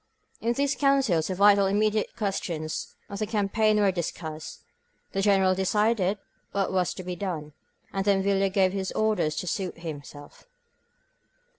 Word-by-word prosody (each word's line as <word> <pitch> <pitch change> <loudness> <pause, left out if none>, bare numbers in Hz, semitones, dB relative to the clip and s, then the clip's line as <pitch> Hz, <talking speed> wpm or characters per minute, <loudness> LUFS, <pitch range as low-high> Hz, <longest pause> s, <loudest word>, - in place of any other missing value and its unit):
In 235 +1 0
these 280 +2 +1
councils 270 - +2
the 185 - -2
vital 200 0 +5
immediate 215 +2 +1
questions 175 -7 -3
of 200 -1 -6
the 215 - -1
campaign 215 0 +2
were 200 -2 +4
discussed, 160 -3 -5 0.5
the 195 - -1
Generals 190 -2 +3
decided 210 0 +2 0.4
what 200 -1 0
was 185 -2 0
to 185 - -7
be 180 0 -4
done, 165 -5 -4 0.2
— - - -37
and 195 - 0
then 195 -1 +2
Villa 195 0 +2
gave 190 -1 +2
his 190 -1 -2
orders 205 -8 +1
to - - -3
suit 185 0 -3
him 160 -4 -6
self. 145 - -14
195 Hz, 160 wpm, -27 LUFS, 180-210 Hz, 0.5 s, vital